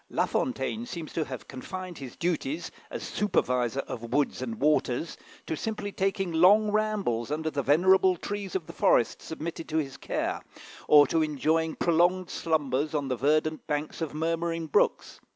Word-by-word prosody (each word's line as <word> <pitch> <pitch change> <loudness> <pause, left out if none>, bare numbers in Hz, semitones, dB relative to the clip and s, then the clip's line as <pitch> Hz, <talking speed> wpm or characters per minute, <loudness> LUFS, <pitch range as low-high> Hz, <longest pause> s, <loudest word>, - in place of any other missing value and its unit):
La - - +1
Fontaine 235 -2 -2
seems 170 -9 -7
to 160 - 0
have 130 -2 -8
confined 180 +6 -7
his 130 -4 -8
duties, 165 -2 -2 0.2
as - - -6
supervisor 125 - 0
of 115 - -7
woods 145 -1 +1
and 115 -4 -4
waters, 150 0 +1 0.3
to - - -2
simply 210 +3 -4
taking 195 -1 -1
long 200 +6 +5
rambles 210 - 0
under 160 +1 -2
the 140 - -1
venerable 185 +7 +4
trees 200 +1 -5
of 180 -4 -1
the - - -10
forests 115 - +2
submitted 165 +1 -6
to 160 - -1
his 140 -4 -2
care, - - -2 0.5
or 145 -1 +8
to 160 +4 +1
enjoying 155 +2 +1
prolonged 175 +2 +2
slumbers 150 -2 0
on 140 -2 -1
the 130 - 0
verdant 155 +4 +1
banks 150 +2 -3
of 160 - -2
murmuring 165 +1 -1
brooks. 155 - +1
160 Hz, 165 wpm, -28 LUFS, 145-180 Hz, 0.5 s, or